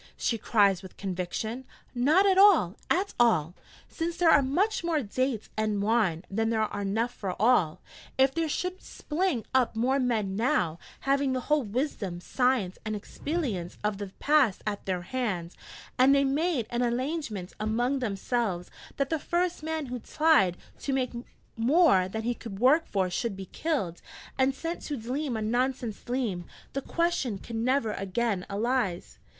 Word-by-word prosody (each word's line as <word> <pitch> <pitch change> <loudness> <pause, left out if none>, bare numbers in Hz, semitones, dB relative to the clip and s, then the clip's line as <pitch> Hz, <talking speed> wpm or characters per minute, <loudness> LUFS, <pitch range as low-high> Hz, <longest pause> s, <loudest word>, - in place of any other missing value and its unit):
she 235 - 0
cries 200 -4 +3
with 190 -2 -12
conviction: 195 +6 -3 0.3
'not 295 +10 +4
at 385 -1 +4
all, 380 - +6
at 385 +3 +1
all: 175 -9 +3 0.3
since 335 0 -3
there 340 -2 +5
are 290 - +6
much 360 +11 +1
more 325 -4 0
dates 240 +1 -1
and 215 -2 0
wine 200 -6 +1
than 225 +3 0
are 215 -2 -1
enough 220 +5 -1
for 190 -3 -5
all. 210 -8 +3 0.4
If 265 0 +4
there 330 -1 -1
should 365 +4 -2
spling 310 -6 -2
up 255 -3 +2
more 255 +5 +2
men 220 -7 0
now, 210 - +1 0.2
having 275 0 +1
the 255 - -1
whole 300 +3 +2
wisdom, 210 - -3
science, 245 -2 0
and 215 -1 -3
expelience 210 - -3
of 210 -1 -1
the 205 - -4
past 285 -9 +3
at 205 -2 -4
their 180 -2 -1
hand, 190 -7 -3 0.4
and 265 +2 +6
they 280 - +4
made 285 -1 +1
an 240 0 0
allangement 245 - -2
among 240 +6 0
themselves 205 -4 -2 0.3
that 275 +1 -1
the 320 - +1
first 350 +2 -1
man 315 -1 -3
who 250 -1 -5
tlied 295 - +3 0.2
to 275 - -2
take 255 -2 0 0.4
more 240 - +4
than 220 +4 -4
he 240 +2 0
could 225 -4 -8
work 270 +9 +4
for 190 -2 0
should 220 +3 -2
be 195 - -6
killed, 225 - -2 0.3
and 265 0 +2
sent 335 +4 -4
to 290 - -4
dleam 250 +2 -2
a 220 - -2
nonsense 245 0 -1
dleam, 235 -9 -2 0.3
the 275 - -2
question 335 - 0
could 230 +4 -8
never 235 0 +1
again 195 0 -1
alise!' 210 -3 -1
240 Hz, 165 wpm, -28 LUFS, 200-280 Hz, 0.4 s, all